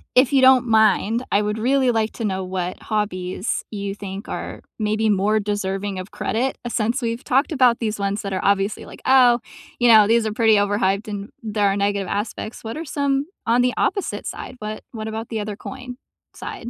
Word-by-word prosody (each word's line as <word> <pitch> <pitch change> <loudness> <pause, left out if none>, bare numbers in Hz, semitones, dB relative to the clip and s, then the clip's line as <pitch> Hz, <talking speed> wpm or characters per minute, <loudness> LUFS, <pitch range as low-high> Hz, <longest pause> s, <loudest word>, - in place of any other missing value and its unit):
if 255 +1 +5
you 270 - +5
don't 260 -1 +6
mind, 220 +1 +3
I 200 - +3
would 210 +1 -2
really 260 +2 +3
like 225 -1 0
to 230 - -4
know 190 -2 -1
what 185 -1 -4
hobbies 200 -2 -2
you 200 -1 -4
think 200 0 -7
are - - -5 0.2
maybe 215 0 +1
more 210 +2 +2
deserving 200 -1 -2
of 185 - -8
credit, 255 +4 -1
since 235 +3 0
we've 230 0 -3
talked 270 +5 +1
about 250 -4 +4
these 215 -3 -2
ones 200 +1 -1
that 200 -1 -4
are 185 - -1
obviously 200 +1 +1
like, - - -12
"Oh, 250 -2 +6 0.4
you 245 -1 +4
know, 215 -2 +8
these 230 0 +3
are 215 - -3
pretty 220 -1 +4
overhyped 205 0 +1
and 205 -1 -5
there 210 -2 +1
are 195 +1 +1
negative 200 -1 0
aspects." 215 +1 -4
What 225 +3 -5
are 325 - -5
some 280 0 0 0.2
on 235 +2 +4
the 250 - +1
opposite 400 - -1
side, - - -7
what 215 0 -6
what 220 -2 -6
about 220 +1 -5
the 220 -2 -2
other 205 -1 -5
coin 250 0 -8 0.4
side? 235 - -7
215 Hz, 200 wpm, -22 LUFS, 200-240 Hz, 0.4 s, know